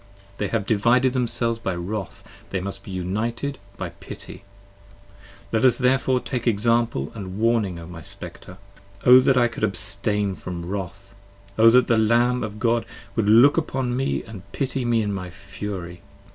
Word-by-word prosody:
They 105 Hz, -, 0 dB
have 110 Hz, -1 st, -1 dB
divided 120 Hz, +5 st, +3 dB
themselves 115 Hz, -2 st, 0 dB
by 95 Hz, -5 st, -2 dB
Wrath, 95 Hz, +3 st, -5 dB, 0.3 s
they 95 Hz, -, -2 dB
must 100 Hz, +2 st, -5 dB
be -, -, -12 dB
united 110 Hz, +9 st, -3 dB, 0.2 s
by 90 Hz, -, -4 dB
Pity: 85 Hz, -, -10 dB, 1.1 s
let 110 Hz, -1 st, +1 dB
us 125 Hz, -3 st, +5 dB
therefore 130 Hz, 0 st, +2 dB
take 125 Hz, -1 st, -4 dB
example 115 Hz, -, +1 dB
& -, -, -21 dB
warning 105 Hz, -1 st, 0 dB
O 85 Hz, -, -8 dB
my 85 Hz, -1 st, -9 dB
Spectre. 90 Hz, +4 st, -9 dB, 0.5 s
O 125 Hz, +1 st, +9 dB
that 130 Hz, 0 st, +3 dB
I 120 Hz, -1 st, +5 dB
could 115 Hz, -, -7 dB
abstain 100 Hz, 0 st, 0 dB
from 85 Hz, -1 st, -6 dB
wrath! 100 Hz, +1 st, -6 dB, 0.4 s
O 115 Hz, +2 st, +7 dB
that 125 Hz, +2 st, +5 dB
the 115 Hz, -2 st, +3 dB
Lamb 120 Hz, +3 st, +3 dB
60 -, -, -1 dB
Of 105 Hz, 0 st, -11 dB
God 115 Hz, 0 st, +1 dB, 0.3 s
would 105 Hz, -2 st, +1 dB
look 120 Hz, +8 st, +7 dB
upon 130 Hz, -6 st, -1 dB
me 135 Hz, +2 st, -1 dB
and 110 Hz, -4 st, -10 dB
pity 135 Hz, -2 st, -2 dB
me 115 Hz, -2 st, +2 dB
in 105 Hz, -1 st, -2 dB
my 90 Hz, -2 st, -5 dB
fury. 95 Hz, -2 st, -7 dB
110 Hz, 170 wpm, -23 LUFS, 95-120 Hz, 1.1 s, O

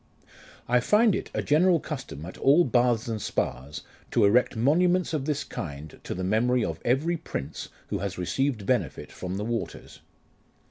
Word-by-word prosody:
I 125 Hz, +1 st, +4 dB
find 210 Hz, -, +4 dB
it -, -, -3 dB
a -, -, -2 dB
general 170 Hz, +3 st, +4 dB
custom 135 Hz, -, -6 dB
at 90 Hz, -, -8 dB
all 145 Hz, +6 st, +5 dB
baths 120 Hz, -4 st, +2 dB
and 110 Hz, -2 st, -3 dB
spas, 70 Hz, -3 st, -3 dB, 0.3 s
to 115 Hz, -, +3 dB
erect 120 Hz, +5 st, +3 dB
monuments 175 Hz, +9 st, +2 dB
of 145 Hz, -4 st, -1 dB
this 150 Hz, -1 st, -1 dB
kind 75 Hz, -2 st, -7 dB
to -, -, -4 dB
the 90 Hz, -, -4 dB
memory 115 Hz, +5 st, +2 dB
of -, -, -4 dB
every 150 Hz, +8 st, +1 dB
prince 75 Hz, -, -6 dB, 0.2 s
who -, -, -2 dB
has 100 Hz, -1 st, -4 dB
received 110 Hz, +4 st, -1 dB
benefit 110 Hz, -, -1 dB
from 90 Hz, +1 st, -5 dB
the 105 Hz, -, -3 dB
waters. 115 Hz, 0 st, -5 dB
120 Hz, 170 wpm, -27 LUFS, 100-150 Hz, 0.3 s, all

